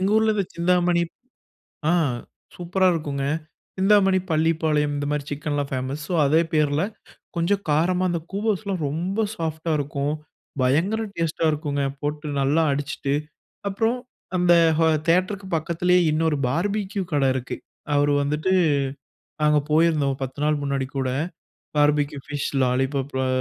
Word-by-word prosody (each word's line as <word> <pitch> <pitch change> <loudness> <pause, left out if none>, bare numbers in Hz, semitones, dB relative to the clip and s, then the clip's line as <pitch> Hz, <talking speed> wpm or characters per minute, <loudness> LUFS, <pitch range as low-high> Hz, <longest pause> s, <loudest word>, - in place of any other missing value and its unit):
எங்க 190 +2 +1
ஊர்ல 220 -1 +2
இந்த 195 -3 0
சிந்தாமணி 175 0 +2 0.9
ஆ - - +3 0.6
சூப்பரா 185 +2 +1
இருக்குங்க. 140 -3 -3 0.5
சிந்தாமணி, 195 -1 +4
பள்ளிப்பாளையம், 155 -2 +1
இந்த 145 0 -2
மாரி 150 -1 -1
சிக்கன்லாம் 145 -1 -2
ஃபேமஸ். 130 +3 -3
ஸோ 180 - -1
அதே 155 +4 +4
பேர்ல 150 +1 +2 0.5
கொஞ்சம் 190 +4 +1
காரமா 175 +5 +2
அந்த 170 -1 -1
கூவோஸ்லாம் 200 -3 -1
ரொம்ப 180 +9 -1
சாஃப்டா 160 -2 -3
இருக்கும். 145 0 -2 0.5
பயங்கர 165 +13 +2 0.2
டேஸ்ட்டா 165 0 0
இருக்குங்க. 145 -2 -2 0.2
போட்டு 150 +1 -3
நல்லா 150 +4 +3
அடிச்சுட்டு, 140 0 -2 0.6
அப்புறம் 225 +5 0 0.4
அந்த 180 -1 +4 0.3
ஹா 165 - +4 0.2
தியேட்டருக்கு 185 +3 +1
பக்கத்திலயே 175 +3 +2
இன்னொரு 155 -1 +1
பார்பிக்யூ 200 - -1
கடை 140 -2 +3
இருக்கு. 125 -1 -4 0.4
அவரு 145 0 +3
வந்துட்டு 150 +6 0 0.9
நாங்க 150 0 +4
போயிருந்தோம். 155 -3 +3
ஒரு 135 - -10
10 130 +2 -6
நாள் 150 -1 +2
முன்னாடி 140 -1 -1
கூட, 130 -1 0 0.7
பார்பிக்யூ. 145 0 +2
Fish 145 -1 -3
lollipop. 135 +2 0
அ - - 0
155 Hz, 130 wpm, -24 LUFS, 145-180 Hz, 0.9 s, சிந்தாமணி